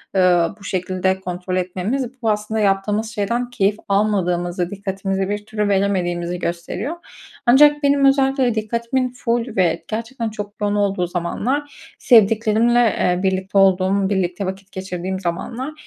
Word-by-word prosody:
ııı, 180 -1 +3
bu - - -16
şekilde 185 0 -1
kontrol 180 0 -4
etmemiz 225 +9 -3
bu 225 - +1
aslında 210 +1 -1
yaptığımız 205 +2 +1
şeyden 235 +4 -2
keyif 205 -4 +1
almadığımızı, 180 -3 0
dikkatimizi 195 -1 -3
bir 205 0 -3
türlü 210 -1 -2
veremediğimizi 180 -3 0
gösteriyor. 175 - -4 0.5
Ancak 295 +4 +6
benim 280 0 +3
özellikle 270 -3 +3
dikkatimin 235 +4 -1
ful 235 -1 -2
ve 175 -4 +1
gerçekten 230 +1 -4
çok 205 -1 -7
yoğun 205 0 +1
olduğu 195 -3 0
zamanlar 250 +12 -3
sevdiklerimle, 225 +1 +4 0.2
eee, 180 0 +1
birlikte 190 +1 -1
olduğum, 195 0 +3
birlikte 190 -1 -1
vakit 190 +1 -6
geçirdiğim 190 0 -4
zamanlar 230 - -4
200 Hz, 130 wpm, -20 LUFS, 185-230 Hz, 0.5 s, Ancak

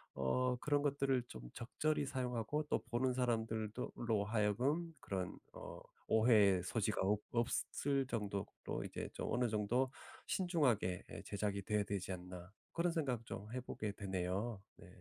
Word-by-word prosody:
어 125 - +2
그런 145 +3 +2
것들을 140 -3 +2
좀 65 - -8
적절히 150 +5 0
사용하고 125 +1 -1
또 - - +3
보는 125 +2 +2
사람들도 115 -2 0
로 110 -4 +1
하여금 120 +11 +1
그런 95 -2 -3 0.2
어 - - -7 0.3
오해의 105 -5 +6
소지가 110 +2 0
없 100 +2 +3
없을 135 +3 +1
정도로 105 -4 -1 0.4
이제 - - -4
좀 - - -3
'어느 125 +1 +3
정도 115 +4 +1 0.3
신중하게 130 - +2
예 - - -6
제작이 100 -1 -1
돼야 105 0 +1
되지 95 -2 -2
않나.' 90 0 -7 0.2
그런 170 +1 +2
생각 130 -8 0
좀 105 +2 -6
해 130 - -1
보게 110 -4 -3
되네요. 95 +2 -2 0.2
네. - - -13
115 Hz, 290 characters per minute, -38 LUFS, 100-130 Hz, 0.4 s, 오해의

